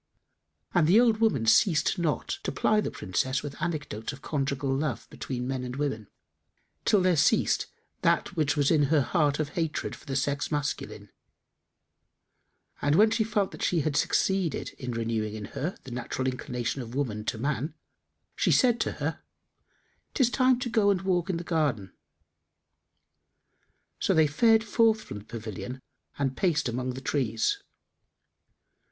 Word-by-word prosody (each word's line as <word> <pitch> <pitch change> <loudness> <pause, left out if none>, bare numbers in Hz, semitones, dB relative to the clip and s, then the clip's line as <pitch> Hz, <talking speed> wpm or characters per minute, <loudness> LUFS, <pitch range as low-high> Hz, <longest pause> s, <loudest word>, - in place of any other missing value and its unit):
And 175 -4 +4
the 195 +7 +6
old 235 -3 +4
woman 215 - +2
ceased 155 - +3
not 160 -4 -1
to - - -3
ply 215 0 +2
the - - -2
Princess 130 +9 -2
with 145 -1 -6
anecdotes 145 -10 -3
of 140 -1 -12
conjugal 140 -2 -1
love 140 -4 -2
between 125 -1 -4
men 130 -1 -2
and 125 0 -5
women, 135 -8 -2 0.8
till 200 -3 +4
there 180 -1 +4
ceased 145 - +2 0.3
that - - +1
which 150 -1 +1
was 145 -1 +3
in 150 -3 +4
her 150 +1 +3
heart 145 0 +1
of 155 -2 -2
hatred 160 0 -2
for - - -18
the 135 - -3
sex 140 +2 -1
masculine; 145 -1 -3 1.7
and 145 +1 +2
when 215 +4 +5
she 225 0 +2
felt 210 -3 0
that - - -10
she 170 -3 +2
had 145 0 -1
succeeded 190 0 +1
in 125 - -5
renewing 115 -2 -2
in 105 -1 -6
her 170 +7 -3
the 130 - -10
natural 125 +2 -3
inclination 125 0 -3
of 120 0 -8
woman 115 -7 -2
to 115 - -2
man, 145 +5 -2 0.6
she - - +2
said 245 -3 +4
to - - -1
her, - - -3 0.9
"'Tis 245 -3 +3
time 255 -1 +4
to 250 - -1
go 210 -3 +3
and 190 -2 +1
walk 185 -1 0
in 180 - 0
the 170 - -5
garden." 145 - -1 2.1
So - - +2
they 160 -1 +6
fared 220 +9 +4
forth 225 0 +2
from 105 - -7
the 105 - -15
pavilion 115 +3 -6 0.4
and 135 -2 -1
paced 160 -5 +1
among 125 +1 -3
the 130 - -7
trees. 120 -6 0
145 Hz, 160 wpm, -28 LUFS, 125-180 Hz, 2.1 s, the